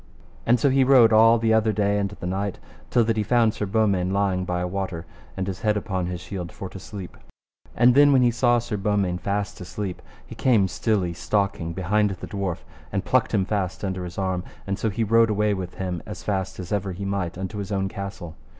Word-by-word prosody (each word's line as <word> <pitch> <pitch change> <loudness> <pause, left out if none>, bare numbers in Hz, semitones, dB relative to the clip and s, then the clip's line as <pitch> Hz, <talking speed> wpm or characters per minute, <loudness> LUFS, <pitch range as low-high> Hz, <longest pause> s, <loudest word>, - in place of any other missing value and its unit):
And 120 +1 +4
so 140 - +3
he 135 0 +4
rode 125 -4 +6
all 115 +1 +7
the 110 -1 +2
other 110 0 +3
day 105 -1 +1
and 100 -1 -1
the 100 -3 -9
night 95 +2 -2 0.3
till 120 - +3
that 115 0 0
he - - +2
found 115 0 +3
Sir 105 -2 -3
Beaumains 100 -3 +1
lying 95 -2 0
by 90 0 -1
a 90 - -1
water, 95 -3 -4 0.3
and 95 - -1
his 95 -1 -5
head 105 -1 +2
upon 95 -3 -2
his 90 -1 -4
shield, 90 -3 -6
for 95 - -7
to 95 - -9
sleep. 95 -1 -8 0.6
And 120 +1 +5
then 145 +2 +6
when 130 -2 +5
he 120 - +4
saw 120 +1 +3
Sir 115 -2 -3
Beaumains 100 -3 0
fast 100 0 -2
asleep, 90 +1 -5 0.2
he - - -10
came 110 -7 +3
stilly 95 -3 0
stalking 100 -3 -1
behind 105 +4 +1
the 95 -2 -6
dwarf, 100 -4 -4 0.3
and - - -2
plucked - - +2
him 95 - +1
fast 100 -2 -2
under 95 -1 -3
his 90 -1 -8
arm, 95 -2 -1 0.2
and 100 +1 -3
so 110 - 0
he 110 +3 -1
rode 115 +1 +4
away 105 0 +1
with 95 -2 -5
him 90 -3 -3
as - - -7
fast 95 -2 -2
as 90 -2 -7
ever 100 -2 -1
he 100 +3 -6
might 95 -4 -2
unto 95 +2 -5
his 100 +1 -5
own 95 -1 0
castle. 95 -4 -7
100 Hz, 225 wpm, -24 LUFS, 95-110 Hz, 0.6 s, all